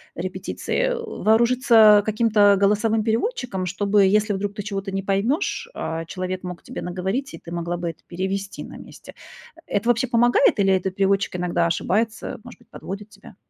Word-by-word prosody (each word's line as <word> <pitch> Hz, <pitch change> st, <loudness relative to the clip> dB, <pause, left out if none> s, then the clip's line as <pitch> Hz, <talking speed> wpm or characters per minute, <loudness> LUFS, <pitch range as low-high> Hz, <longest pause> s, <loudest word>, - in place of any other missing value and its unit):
репетиции, -, -, -2 dB
о, 470 Hz, -1 st, -5 dB, 0.2 s
вооружиться 225 Hz, -2 st, +5 dB
каким-то 215 Hz, 0 st, +1 dB, 0.2 s
голосовым 210 Hz, +2 st, +2 dB
переводчиком, 225 Hz, -, -1 dB
чтобы, 200 Hz, +2 st, +2 dB
если 210 Hz, 0 st, -1 dB
вдруг 200 Hz, +1 st, -3 dB
ты 205 Hz, -, -6 dB
чего-то 195 Hz, -1 st, -4 dB
не 195 Hz, 0 st, -2 dB
поймёшь, 235 Hz, -, -1 dB
а 165 Hz, 0 st, -4 dB
человек 185 Hz, +2 st, -5 dB
мог 180 Hz, -1 st, -7 dB
тебе -, -, -7 dB
наговорить, 190 Hz, +10 st, -3 dB
и -, -, -7 dB
ты 170 Hz, -, -12 dB
могла 170 Hz, 0 st, -3 dB
бы 175 Hz, 0 st, -4 dB
это 165 Hz, -, -11 dB
перевести 190 Hz, +2 st, -4 dB
на -, -, -11 dB
месте. -, -, -13 dB, 0.6 s
Это 205 Hz, +3 st, +1 dB
вообще 240 Hz, +2 st, +2 dB
помогает, 240 Hz, -1 st, +3 dB
или 195 Hz, -1 st, +3 dB
это 190 Hz, 0 st, 0 dB
переводчик 195 Hz, 0 st, 0 dB
иногда 175 Hz, -1 st, 0 dB
ошибается, 210 Hz, +7 st, -1 dB
может -, -, -13 dB
быть, -, -, -24 dB
подводит 200 Hz, +2 st, -8 dB
тебя? 200 Hz, 0 st, -15 dB
200 Hz, 170 wpm, -22 LUFS, 185-225 Hz, 0.6 s, вооружиться